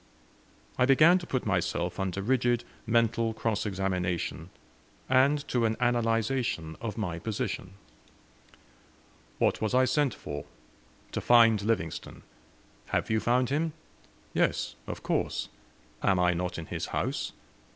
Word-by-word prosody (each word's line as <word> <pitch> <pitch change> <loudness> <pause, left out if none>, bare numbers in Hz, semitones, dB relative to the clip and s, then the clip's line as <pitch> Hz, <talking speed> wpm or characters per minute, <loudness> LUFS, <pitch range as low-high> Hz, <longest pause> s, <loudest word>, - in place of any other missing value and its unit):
I 125 - +4
began 155 +7 +6
to 175 - -9
put 130 - -2
myself 90 -2 -1
under 95 0 -2
rigid 120 0 +2 0.2
mental 115 0 +2
cross 110 -1 -1
examination, 90 -3 -2 0.6
and 140 +3 +3
to 120 -2 +1
an 110 0 0
analyzation 115 -7 0
of 110 -2 -4
my 90 -6 -2
position. 95 -2 -4 1.6
"What - - +1
was 110 +3 0
I 130 0 +5
sent 135 -1 +1
for?" 75 0 -6 0.7
"To - - -2
find 115 -3 +6
Livingstone." 100 -7 -2 0.6
"Have - - -1
you 110 - +3
found 125 +3 +1
him?" 155 +2 0 0.6
"Yes, - - +1
of - - -6
course; - - -1 0.5
am 95 - +3
I 90 0 +3
not 90 +1 -3
in 85 - -5
his - - -4
house? - - -2
115 Hz, 130 wpm, -29 LUFS, 95-125 Hz, 1.6 s, began